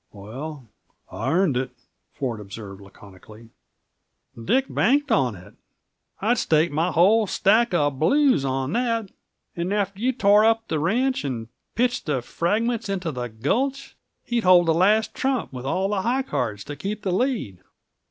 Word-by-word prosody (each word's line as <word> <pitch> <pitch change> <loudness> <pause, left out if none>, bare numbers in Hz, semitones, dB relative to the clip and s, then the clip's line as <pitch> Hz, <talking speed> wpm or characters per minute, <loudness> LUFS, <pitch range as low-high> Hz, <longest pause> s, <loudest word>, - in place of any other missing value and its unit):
"Well, 130 +7 -8 0.4
I - - -3
earned 175 -4 +2
it," 130 0 -2 0.5
Ford 125 -6 -3
observed 100 -1 -9
laconically. 100 +3 -15 0.9
"Dick 250 - +1
banked 285 +3 +1
on 125 -6 +2
it 95 +3 -14 0.7
I'd 225 +4 +1
stake 160 -6 +2
my 160 +4 0
whole 205 +7 +4
stack 220 +5 +3
of 145 -4 0
blues 275 - +3
on 135 +2 -2
that. 230 -4 -1 0.4
And 175 +2 -3
after 200 -1 -1
you'd 255 0 0
torn 210 +2 +5
up 225 0 +1
the 155 - 0
ranch, 245 - 0
and 120 -5 -4 0.3
pitched 245 -4 0
the 135 -5 -1
fragments 215 - -1
into 185 -4 -2
the 125 -2 -5
gulch, 265 - -2 0.3
he'd 240 -2 -1
hold 180 -1 +6
the 165 - +3
last 215 +6 +2
trump, 260 - -2
with 130 +1 -6
all 190 +7 0
high 235 +7 0
cards 110 - -3
to 145 - -7
keep 205 +8 -5
the 190 - -1
lead. 200 - -1
180 Hz, 155 wpm, -23 LUFS, -, 0.9 s, hold